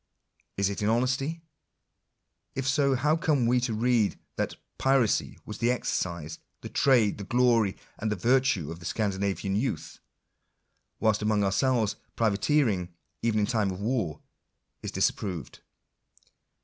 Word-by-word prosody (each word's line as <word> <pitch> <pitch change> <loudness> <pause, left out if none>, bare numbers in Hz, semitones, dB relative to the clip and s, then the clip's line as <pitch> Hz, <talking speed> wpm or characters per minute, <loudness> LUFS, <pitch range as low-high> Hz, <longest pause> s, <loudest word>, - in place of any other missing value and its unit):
Is 100 0 +1
it 100 - -5
in 105 - +2
honesty? 130 +7 0 1.1
If 135 0 -2
so, 140 0 +3
how 150 +5 +2
come 150 -6 +1
we 125 +2 +3
to 120 -2 -1
read 115 -2 +2 0.2
that - - -2
" - - -51
piracy 135 -5 +2
was - - -7
the 115 - +2
exercise, 85 -10 -2 0.2
the - - -7
trade, 120 -7 +3
the - - -4
glory, 115 -2 +2 0.2
and 110 0 -1
the - - +1
virtue 115 - +2
of 85 - -8
the 85 - -12
Scandinavian 100 -1 -1
youth;" 105 - -2 1.0
whilst 110 -1 +2
amongst 105 -1 +2
ourselves 110 +2 +1 0.2
privateering, 105 -3 +1 0.3
even 110 -2 +1
in - - +3
time 110 -3 +1
of 95 0 -5
war, 100 - -1 0.6
is - - -5
disap - - +1
proved? 90 -6 -6
110 Hz, 145 wpm, -28 LUFS, 100-125 Hz, 1.1 s, so